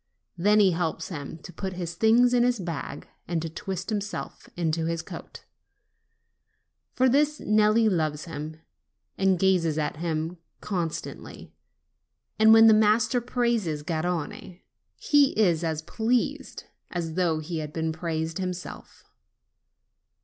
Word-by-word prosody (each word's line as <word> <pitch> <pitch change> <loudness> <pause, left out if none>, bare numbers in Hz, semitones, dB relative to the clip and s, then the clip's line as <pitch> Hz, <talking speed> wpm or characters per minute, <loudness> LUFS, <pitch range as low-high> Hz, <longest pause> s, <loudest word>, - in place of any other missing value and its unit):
Then 205 +5 +3
he 195 -3 +5
helps 165 -1 -2
him 155 -2 -6
to 180 - -10
put 190 +3 -5
his 175 -2 -5
things 235 +6 +4
in 245 - +4
his 245 0 +2
bag 165 -5 -5 0.2
and 170 -1 -1
to 165 - -3
twist 190 +4 -5
himself 210 0 -5
into 165 -1 0
his 165 -1 -2
coat. - - -10 1.5
For 260 +1 +4
this 295 +4 +2
Nelli 215 +1 +3
loves 155 -6 0
him, 155 -1 -7 0.6
and 190 -1 +2
gazes 175 -4 +2
at 150 -1 -2
him 165 +1 -3 0.2
con 175 -5 -2
stantly; - - -9 0.9
and 220 0 +7
when 225 0 +8
the 220 - +8
master 220 +3 +3
praises 235 -11 -1
Garrone 170 +2 -3 0.3
he 285 -6 +3
is 175 -6 +3
as 160 -1 -2
pleased, 230 +7 -1 0.3
as 165 -2 -4
though 170 -2 +1
he 160 +1 -4
had 150 -1 -5
been 160 0 -2
praised 160 +1 -3
himself. 180 -1 -6
180 Hz, 135 wpm, -26 LUFS, 160-215 Hz, 1.5 s, when